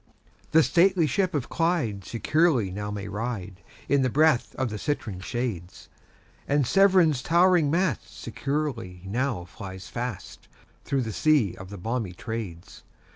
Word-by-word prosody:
The 160 0 +5
stately 180 0 +4
ship 185 +5 0
of 140 -4 -1
Clyde 165 - 0
securely 130 - +1
now 105 +2 -4
may 105 -1 -5
ride, 100 -3 -5 0.3
In 140 -1 +3
the 130 - +2
breath 150 -1 +2
of 130 -4 -2
the 105 - -5
citron 115 -10 -3
shades; 95 -5 -5 0.6
And 145 -1 +2
Severn's 185 -5 +4
towering 170 -1 +4
mast 165 - -1
securely 125 -12 -3
now 115 -2 -2
flies 95 -1 -9
fast, 120 -5 -6 0.4
Through 135 -2 0
the 110 -2 -4
sea 145 - +2
of 95 0 -10
the 100 - -8
balmy 110 0 -3
Trades. 95 -4 -7
125 Hz, 140 wpm, -26 LUFS, 100-155 Hz, 0.6 s, The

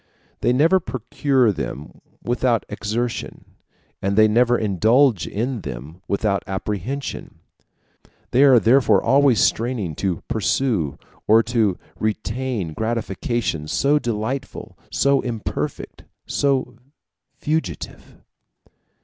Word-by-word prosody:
They - - +2
never 160 +9 +4
procure 130 -3 0
them 75 -5 -6 0.2
without 120 -2 0
exertion, 115 +3 -4 0.6
and 100 +1 0
they 110 0 +7
never 120 +3 +3
indulge 110 - +2
in 120 +2 -3
them 70 +6 -8
without 100 -1 0
apprehension. 105 +7 -4 1.0
They 125 - +3
are 130 -4 +7
therefore 115 -3 +4
always 135 -4 +4
straining 115 -8 0
to 95 -4 -2
pursue 110 - 0 0.3
or 110 +2 +6
to 110 -5 +1 0.2
retain 110 -3 -2
gratifications 110 -5 -2
so 145 +3 +3
delightful, 120 +2 -4 0.2
so 140 0 +2
imperfect, 115 -4 -5 0.2
so 130 -4 0 0.6
fugitive. 160 +2 -4
115 Hz, 100 wpm, -21 LUFS, 100-130 Hz, 1.0 s, they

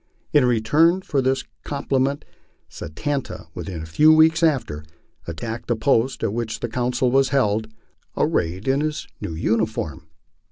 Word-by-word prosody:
In 145 -4 +5
re 120 -2 +2
turn 165 +11 +3
for 140 -6 0
this 130 +1 0 0.2
compliment 140 -1 -1 0.4
Satanta, 140 - -5
within 85 -5 -6
a - - -6
few 150 - +5
weeks 160 +1 +5
after, 130 - +1 0.4
attacked 110 +8 -5
the 120 - +1
post 125 +2 +1
at 100 - 0
which 110 -2 -3
the 120 - -3
council 125 +1 0
was 135 0 +3
held, 110 -5 +1 0.5
arrayed 90 +5 0
in 135 +2 +2
his 155 0 -3
new 80 - -4
uniform. 110 -5 -1
125 Hz, 150 wpm, -22 LUFS, 110-140 Hz, 0.5 s, In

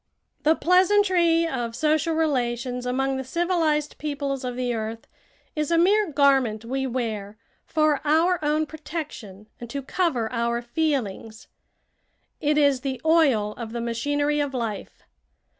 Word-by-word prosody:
The 315 +2 +4
pleasantry 360 -2 +3
of 240 -6 -3
social 310 +3 +1
relations 250 -5 -1
among 270 +2 0
the 265 - -3
civilized 315 0 0
peoples 280 -3 -3
of 250 -1 -3
the 250 -1 -1
earth 225 0 -5 0.5
is 300 -1 -1
a 335 - +3
mere 395 +2 +3
garment 270 -6 +2
we 265 +2 -2
wear 220 -5 -4 0.3
for 305 -2 +2
our 320 +3 +2
own 305 +1 +1
protection 295 - -7
and 240 - -8
to 275 +3 -4
cover 270 -7 0
our 235 0 0
feelings. 235 -6 -3 0.9
It 300 -1 +1
is 280 -3 +3
the 265 -1 -3
oil 280 -11 +3
of 230 -2 -7
the 240 - -3
machinery 290 +6 0
of 285 -2 -2
life. 225 -4 -5
275 Hz, 140 wpm, -24 LUFS, 240-315 Hz, 0.9 s, The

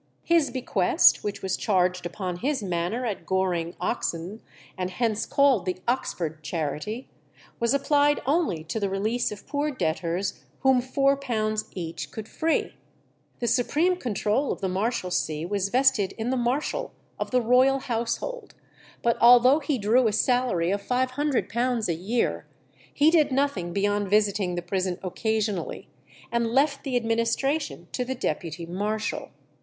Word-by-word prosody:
His 335 -4 +3
bequest, 210 -8 +3
which 205 -1 -4
was 190 -1 0
charged 180 -3 +1
upon 180 -1 -4
his 265 +3 -1
manor 180 +7 -2
at 215 -4 -3
Goring, 180 -3 -1
Oxon, 175 +6 -3 0.3
and 185 -1 -3
hence 225 +2 -1
called 280 - +3
the 185 - -1
Oxford 165 -10 -2
Charity, 160 - -4 0.5
was 235 +3 +2
applied 290 +1 +3
only 280 - +1
to 165 +8 -3
the 200 -2 -1
release 215 +5 -1
of 205 -1 -9
poor 290 +1 -1
debtors 180 - -2 0.2
whom 265 -2 +4
£4 255 -5 0
each 170 -3 -5
could 220 -1 -7
free. 320 +6 0 0.7
The - - 0
supreme 300 - +2
control 240 - -1
of - - -4
the 195 - -1
Marshalsea 185 -6 -1
was 200 0 -1
vested 255 -5 +3
in 230 +2 -3
the - - +1
marshal 260 - -1 0.3
of - - -2
the 255 - +3
royal 250 +3 +4
household; 235 - -3 0.5
but 235 0 +2
although 245 +4 +7
he 290 -2 -1
drew 230 +3 +3
a - - +2
salary 220 -7 +1
of 200 0 -1
£500 255 -2 0
a 170 - +1
year, 205 +9 -1 0.4
he 300 +2 +4
did 310 -4 +4
nothing 260 -11 0
beyond 205 +1 0
visiting 205 -3 +2
the 175 - -3
prison 185 0 -1
occasionally, 210 0 -2 0.4
and 235 -1 +1
left 275 +4 +1
the 270 -3 -2
administration 235 +6 0
to 250 - -1
the 260 +1 -3
deputy 170 - -3
marshal. 210 +5 -3
225 Hz, 145 wpm, -26 LUFS, 190-260 Hz, 0.7 s, although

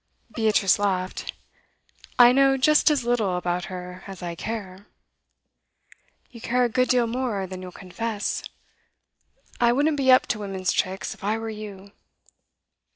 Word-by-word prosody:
Beatrice 215 -4 +2
laughed. 185 -2 -2 0.9
'I 245 0 +8
know 270 +1 +4
just 300 +4 +4
as 290 -5 +1
little 220 -7 +1
about 175 0 -2
her 180 0 -8
as 190 -2 -9
I 170 -1 -4
care.' 200 0 -6 1.4
'You 235 -2 -12
care 250 +2 +1
a 240 - +2
good 255 +2 +1
deal 245 -2 +3
more 230 -4 -2
than 185 0 -8
you'll 185 -1 -8
confess. 205 +4 -4 1.2
I 235 -1 +4
wouldn't 290 +4 +1
be 265 -2 +4
up 255 - +6
to 215 - -9
women's 195 -2 -2
tricks, 190 +1 -2
if - - -17
I 210 +2 0
were 225 0 -5
you. 200 -2 -9
215 Hz, 150 wpm, -24 LUFS, 185-245 Hz, 1.4 s, I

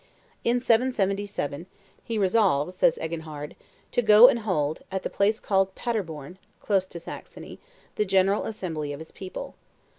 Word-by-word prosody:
In 240 +1 +2
777, 205 - 0 0.4
he 230 - -3
resolved, 185 -6 +2
says 180 - +3
Eginhard, 160 -2 -6 0.4
"to - - +2
go 215 +1 +9
and 235 - +1
hold, 160 -8 -1
at 190 0 -3
the - - -3
place 210 +3 +1
called 195 -2 +1
Paderborn 180 - -4 0.2
(close 195 -3 +1
to 170 - -8
Saxony) - - -10 0.4
the 210 - +2
general 195 +1 +2
assembly 160 -9 -4
of 140 - -8
his 160 - -10
people. 190 -1 -8
190 Hz, 145 wpm, -26 LUFS, 160-215 Hz, 0.4 s, go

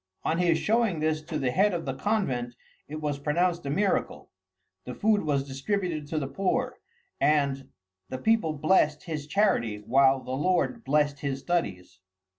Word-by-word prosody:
On 165 - 0
his 170 -2 +3
showing 220 -5 +1
this 155 0 0
to 155 0 -5
the 130 -4 0
head 195 +6 +2
of 165 -1 -4
the 135 - -2
convent, 130 - -1 0.3
it 155 +1 -6
was 145 -2 -2
pronounced 170 +2 0
a - - -2
miracle; 195 +8 -1 0.5
the - - -7
food 210 -1 +2
was 140 -3 -1
distributed 155 +2 -2
to 155 - -3
the 145 - -1
poor, 195 - -1 0.4
and 140 -3 +1 0.4
"the 130 - -4
people 210 0 +2
blessed 155 -1 +2
his 150 -3 -5
charity 155 - +1
while 130 +5 +3
the 130 - -8
Lord 180 - 0
blessed 145 -2 +1
his 135 -1 -3
studies." 95 - -2
155 Hz, 165 wpm, -27 LUFS, 135-185 Hz, 0.5 s, his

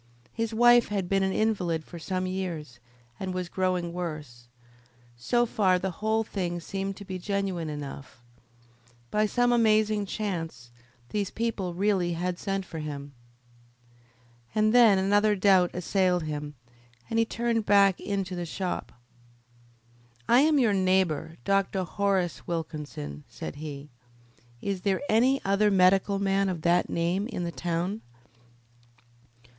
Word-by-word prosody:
His 230 -1 -2
wife 240 +1 +5
had 200 -3 -2
been 195 +1 +1
an 190 0 +1
invalid 180 -7 0
for 170 - -10
some 185 +2 -2
years, 170 -9 -4 0.4
and 185 -1 -4
was 180 -1 -3
growing 180 -2 -1
worse. 150 -9 -6 0.7
So 240 - +1
far 190 -5 +2
the 190 +1 -2
whole 220 +1 +1
thing 175 -5 -3
seemed 195 +3 -4
to 200 - -9
be 185 -1 -5
genuine 190 -4 -2
enough. 140 -4 -8 0.9
By 215 0 +2
some 245 +3 +2
amazing 215 -3 +3
chance 165 - -4 0.4
these 205 -2 -1
people 210 -6 -3
really 190 -2 +1
had 180 +1 -3
sent 195 -1 -2
for 165 - -7
him. 145 -2 -6 1.4
And 215 0 +3
then 230 -5 +7
another 205 +2 +3
doubt 185 -2 +4
assailed 180 -1 +1
him, 150 -1 -5 0.5
and 225 - 0
he - - +5
turned 230 -1 -1
back 200 -2 +5
into 195 -2 -3
the 175 - -3
shop. 185 +2 -4 1.4
"I 240 - +6
am 300 +2 +4
your 235 -6 +3
neighbour, 185 -4 +1
Dr. 195 -1 +1
Horace 190 -2 -1
Wilkinson," 150 - -5
said 80 - -7
he. 145 -2 -8 0.7
"Is 195 -2 -2
there 190 0 0
any 255 +5 +3
other 200 +2 +3
medical 195 +1 +4
man 195 0 +1
of 170 -4 -4
that 175 +1 +3
name 175 +5 0
in 225 -7 -4
the 170 - -3
town?" 175 +5 -2
190 Hz, 140 wpm, -27 LUFS, 170-205 Hz, 1.4 s, then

